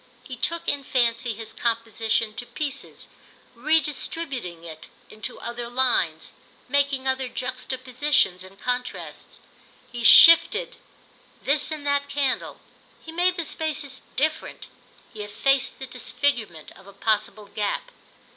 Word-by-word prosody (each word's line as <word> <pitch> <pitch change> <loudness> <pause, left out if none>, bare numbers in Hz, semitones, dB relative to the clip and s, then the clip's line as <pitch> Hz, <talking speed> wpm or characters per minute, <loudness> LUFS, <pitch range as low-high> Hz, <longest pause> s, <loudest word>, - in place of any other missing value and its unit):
He 255 - -8
took, 335 +7 -2
in 285 -1 0
fancy, 235 -2 +1
his 225 +1 -4
composition 225 -1 -1
to 245 - -6
pieces, 280 -2 -5 0.5
redistributing 275 - -1
it 160 -2 -10 0.2
into 215 0 -6
other 235 0 -5
lines, 240 -11 0 0.3
making 275 0 +1
other 260 0 0
juxtapositions 255 -5 0
and 190 +1 -15
contrasts. 250 0 -5 0.5
He 240 -1 -5
shifted 450 - +7 0.7
this 295 +2 +2
and 305 -2 -5
that 285 0 +1
candle, 280 -3 -1 0.5
he 320 - -8
made 355 +2 +2
the 335 -2 -2
spaces 290 -4 -2
different, 310 +3 -2 0.5
he 215 - -7
effaced 265 +6 +1
the 265 - -6
disfigurement 245 - -2
of 195 - -17
a 200 - -13
possible 215 0 -1
gap. 205 0 -3
255 Hz, 120 wpm, -24 LUFS, 225-285 Hz, 0.7 s, shifted